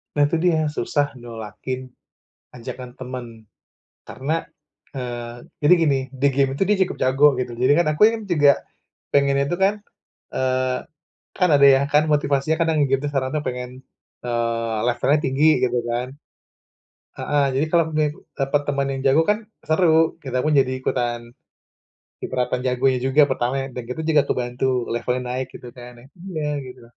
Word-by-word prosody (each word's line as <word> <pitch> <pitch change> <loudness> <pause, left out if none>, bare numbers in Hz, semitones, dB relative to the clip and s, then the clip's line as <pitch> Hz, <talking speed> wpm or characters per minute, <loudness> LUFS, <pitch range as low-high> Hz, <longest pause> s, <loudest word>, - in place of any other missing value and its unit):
Nah, 145 - +4
itu 165 - 0
dia, 170 -3 +3
susah 145 -1 -1
nolakin 120 +3 -7 0.7
ajakan 125 +1 -8
temen, 125 -1 -6 0.8
karena, 135 +7 -3 0.6
eee, 120 -2 -6 0.2
jadi 145 - +7
gini 140 -4 +3 0.2
di 140 - +5
game 135 -1 +2
itu 165 - +1
dia 210 0 +3
cukup 185 - -6
jago 135 +3 +5
gitu. 125 -1 -3
Jadi, 130 +2 +4
kan 170 - +2
aku 150 - -6 0.3
juga 145 -4 +6 0.6
pengennya 140 0 +3
itu 175 - 0
kan, 195 +2 +4 0.6
eee, 130 0 0 0.6
kan 180 -2 +3
ada 140 0 +6
ya, 135 0 +6
kan 150 - +5
motivasinya 145 +1 +1
kan 165 - +2
yang 155 - +1
nge-game 135 0 0
sekarang 130 -2 -1 0.2
pengen, 125 0 -4 0.6
eee, 115 -1 -1
levelnya 140 +4 +2
tinggi 135 +4 +2 0.2
gitu 125 -1 +1
kan. 120 +1 -2 1.1
Heeh, 145 -1 +1
jadi 145 - +2
kalau 170 -1 +4
ni 155 - +3 0.3
dapat 135 +2 +1
teman 140 -1 0
yang 135 -1 -4
jago 140 +4 +5
kan, 210 +1 +2 0.3
seru. 160 -1 +3
Kita 130 -2 -3
pun 155 - +1
jadi 130 -1 +1
ikutan 120 -2 -1 1.0
kecipratan 125 0 -2
jagonya 130 +1 +2
juga 135 +3 +4
pertama 125 -1 -1
ya, - - -5
dan 125 - -5
kita 125 - -4
juga 155 -3 +4
kebantu 125 +1 -1 0.3
levelnya 125 +2 -1
naik 130 0 -2
gitu 125 - -10
kan 125 0 -10
nih, 130 - -17 0.3
iya, 150 -2 -2 0.2
gitu. 125 -1 -12
135 Hz, 160 wpm, -22 LUFS, 125-150 Hz, 1.1 s, jadi